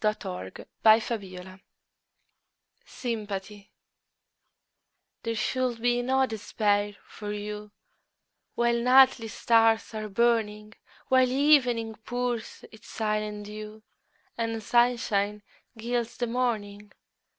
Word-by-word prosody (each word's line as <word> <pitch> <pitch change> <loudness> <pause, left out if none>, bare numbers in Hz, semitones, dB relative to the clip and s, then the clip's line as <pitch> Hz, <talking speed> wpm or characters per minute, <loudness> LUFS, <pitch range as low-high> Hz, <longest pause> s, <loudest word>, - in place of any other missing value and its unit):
Emily 95 - -2 0.3
Bronte 195 -4 +1 1.2
Sympathy 205 -4 -6 1.5
THERE 230 -1 -3
should 250 +1 -1
be 245 +1 +1
no 265 +2 +2
despair 205 -2 -1
for 210 -1 -7
you 210 0 -6 0.9
While 235 0 +1
nightly 255 -2 +5
stars 225 0 +2
are 215 -1 -5
burning; 215 -1 0 0.4
While 260 -1 +4
evening 255 -5 +3
pours 245 -1 -3
its 220 0 -15
silent 210 -1 -2
dew, 215 +1 -9 0.6
And 225 -1 -2
sunshine 210 -4 +1 0.3
gilds 235 +1 -2
the 245 - 0
morning. 215 -4 -2
225 Hz, 90 wpm, -27 LUFS, 210-240 Hz, 1.5 s, nightly